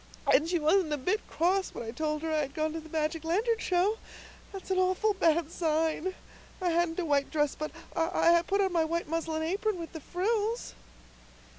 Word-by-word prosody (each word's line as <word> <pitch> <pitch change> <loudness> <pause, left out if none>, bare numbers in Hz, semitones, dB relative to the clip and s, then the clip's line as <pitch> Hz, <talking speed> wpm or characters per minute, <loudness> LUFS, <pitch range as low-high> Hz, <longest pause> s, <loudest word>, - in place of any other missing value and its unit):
And 320 +2 +4
she 355 - +2
wasn't 320 +1 +2
a - - 0
bit 365 +11 0
cross 375 +3 +1
when - - -5
I 225 - -5
told 305 +4 -2
her 320 - -1
I 310 - +2
had 280 -1 -3
gone 310 0 -1
to 325 - -3
the 320 0 -12
magic 315 +1 -1
lantern 435 +8 +1
show. 380 +4 +1 0.5
That's 390 -1 -7
an 375 - +2
awful 370 +3 +2
bad 330 -3 +2
sign. 320 +2 0 0.4
I 360 -2 0
hadn't 340 0 +1
a 355 - -1
white 285 -2 +1
dress, 295 -2 +1
but 305 - -4 0.3
I 335 0 +3
put 400 +1 +2
on 380 -2 +1
my 335 -2 +3
white 335 +1 -2
muslin 320 0 -2
apron 390 +4 -1
with 335 -1 -7
the 320 - -6
frills." 425 - -1
335 Hz, 200 wpm, -29 LUFS, 315-375 Hz, 0.5 s, And